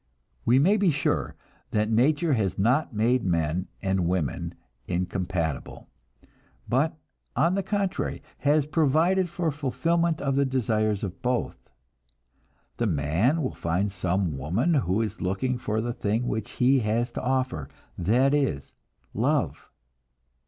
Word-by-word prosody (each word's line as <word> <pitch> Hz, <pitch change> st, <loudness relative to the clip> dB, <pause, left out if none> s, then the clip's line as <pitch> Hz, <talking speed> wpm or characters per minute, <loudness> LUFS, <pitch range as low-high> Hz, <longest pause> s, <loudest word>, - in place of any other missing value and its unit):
We 120 Hz, -, +5 dB
may 185 Hz, +10 st, +4 dB
be 200 Hz, -3 st, +3 dB
sure 145 Hz, -2 st, 0 dB, 0.3 s
that 105 Hz, +1 st, 0 dB
nature 145 Hz, +7 st, +3 dB
has 100 Hz, -7 st, 0 dB
not 125 Hz, +11 st, +2 dB
made 120 Hz, +3 st, +2 dB
men 85 Hz, 0 st, 0 dB, 0.2 s
and 95 Hz, -3 st, +1 dB
women 85 Hz, -7 st, -2 dB, 0.3 s
incompatible, 90 Hz, -3 st, -3 dB, 0.8 s
but 145 Hz, +6 st, +1 dB, 0.4 s
on 165 Hz, +8 st, +3 dB
the 195 Hz, -, +1 dB
contrary, 195 Hz, 0 st, -2 dB, 0.2 s
has 145 Hz, 0 st, +3 dB
provided 165 Hz, +5 st, +2 dB
for 170 Hz, -2 st, -1 dB
fulfillment 165 Hz, +4 st, 0 dB
of 135 Hz, -1 st, 0 dB
the 140 Hz, -, +3 dB
desires 110 Hz, -6 st, 0 dB
of 95 Hz, -2 st, -5 dB
both. 125 Hz, -, -2 dB, 1.1 s
The 120 Hz, -, +1 dB
man 90 Hz, -, +1 dB
will 130 Hz, -, -2 dB
find 90 Hz, +5 st, -1 dB
some 95 Hz, -3 st, -1 dB
woman 95 Hz, -, +1 dB
who 110 Hz, -, +1 dB
is 110 Hz, 0 st, -5 dB
looking 120 Hz, +7 st, -1 dB
for 110 Hz, -2 st, -1 dB
the 120 Hz, +1 st, -2 dB
thing 115 Hz, 0 st, -1 dB
which 110 Hz, -2 st, -3 dB
he 130 Hz, +2 st, +3 dB
has 115 Hz, +2 st, 0 dB
to -, -, -4 dB
offer 130 Hz, -, -1 dB, 0.3 s
that 125 Hz, +10 st, +2 dB
is, 135 Hz, -, 0 dB, 0.4 s
love. -, -, 0 dB
120 Hz, 135 wpm, -26 LUFS, 95-145 Hz, 1.1 s, We